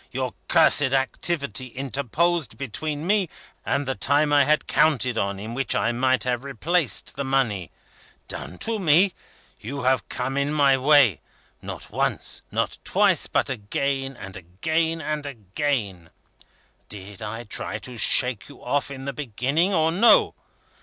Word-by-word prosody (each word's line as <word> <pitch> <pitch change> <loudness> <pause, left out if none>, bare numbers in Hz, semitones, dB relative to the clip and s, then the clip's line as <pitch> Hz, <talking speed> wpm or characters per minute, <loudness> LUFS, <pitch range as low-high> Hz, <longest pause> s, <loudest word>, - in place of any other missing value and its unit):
Your 130 0 -3
cursed 150 -5 +4
activity 135 - 0
interposed 140 +6 -1
between 145 +4 -4
me, 195 -2 +2 0.3
and 140 - -1
the 135 - 0
time 145 +2 +2
I 145 -1 +5
had 150 +1 +2
counted 130 -6 +2
on 100 0 -2
in 110 +3 -6
which 135 +1 0
I 115 - +1
might 130 -1 +1
have 125 -1 -1
replaced 140 - -1
the 140 - -3
money. 125 -10 0 0.6
Done 90 - -7
to 225 -1 -1
me? 180 +2 +4 0.5
You 140 +5 -6
have 130 +1 +1
come 130 +2 -3
in 140 +1 0
my 140 -3 +4
way 130 - +4 0.4
not - - -7
once, - - -1
not - - -2
twice, - - +2
but - - 0
again 135 +3 -2
and 100 -3 -9
again 160 - -2
and 150 0 -3
again. 105 - -3 0.8
Did 100 0 -9
I 110 +2 -5
try 105 -1 -3
to 125 - -8
shake 120 -1 +3
you 140 - -15
off 140 +3 0
in 135 -1 -8
the 140 - -3
beginning, 140 - 0
or 160 -3 +2
no? 205 +8 +5
135 Hz, 150 wpm, -24 LUFS, 120-150 Hz, 0.8 s, I